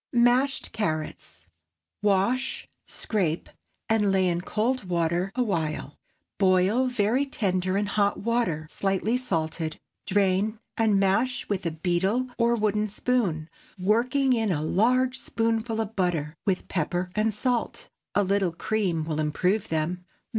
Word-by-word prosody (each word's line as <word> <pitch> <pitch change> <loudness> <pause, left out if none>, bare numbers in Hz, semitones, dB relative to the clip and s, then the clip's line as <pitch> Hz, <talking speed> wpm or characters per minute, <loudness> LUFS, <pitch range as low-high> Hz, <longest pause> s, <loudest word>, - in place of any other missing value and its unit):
MASHED 245 +3 +2
CARROTS. 155 - -4 0.6
Wash, 210 +6 +1 0.2
scrape, 175 -7 -1 0.4
and 210 -3 +2
lay 190 -1 +3
in 175 -1 0
cold 225 +5 -1
water 175 +1 0
a 250 - +2
while. 160 - -2 0.4
Boil 195 +6 +3
very 245 +2 +1
tender 185 -8 -1
in 205 - +1
hot 205 0 +1
water, 225 -9 0
slightly 195 +6 0
salted. 165 -9 -2 0.3
Drain, 200 +2 +2 0.2
and 215 -3 +3
mash 200 +7 +1
with 195 -4 -1
a - - +2
beetle 180 +9 0
or 235 0 +3
wooden 215 -1 +1
spoon, 200 -8 0 0.3
working 245 +8 +2
in 225 -4 +1
a 150 -3 -1
large 255 +9 +2
spoonful 225 0 -1
of 220 0 -3
butter, 170 -5 0
with 190 -2 0
pepper 180 +2 -2
and 215 +1 +1
salt. 240 +3 -1 0.3
A 205 - +4
little 195 -2 +1
cream 185 -3 -1
will 155 -1 -3
improve 180 +7 0
them. 165 +3 -1
200 Hz, 130 wpm, -26 LUFS, 175-225 Hz, 0.6 s, A